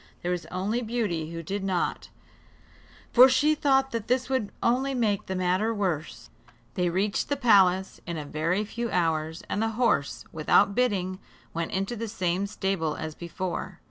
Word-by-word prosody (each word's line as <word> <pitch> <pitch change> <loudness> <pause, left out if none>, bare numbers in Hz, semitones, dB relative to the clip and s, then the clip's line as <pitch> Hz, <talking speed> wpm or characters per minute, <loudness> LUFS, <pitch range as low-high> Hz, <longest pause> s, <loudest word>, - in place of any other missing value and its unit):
There 175 - -1
was 180 -1 -3
only 200 +6 -2
Beauty 215 -9 -2
who 165 0 -6
did 195 +4 -3
not, 185 -3 -1 1.0
for 255 +2 +9
she 290 +4 +4
thought 270 -2 +2
that 230 -2 -3
this 255 +1 +1
would 245 -6 0
only 265 +3 +1
make 215 -5 0
the 190 - -3
matter 185 +4 +1
worse. 180 -7 -3 0.4
They 180 -1 +1
reached 195 +4 0
the 285 - 0
palace 190 -7 +4
in 170 -1 -3
a 150 - -5
very 165 +8 -1
few 235 +2 -4
hours, 160 -2 0
and 205 - -1
the 225 - +2
horse, 230 - +1
without 180 +6 +3
bidding, 190 -6 0 0.3
went 165 0 -3
into 195 +5 -2
the 230 0 -4
same 190 -2 -1
stable 190 -6 -1
as 155 0 -5
before. 175 +3 -5
195 Hz, 170 wpm, -27 LUFS, 175-235 Hz, 1.0 s, for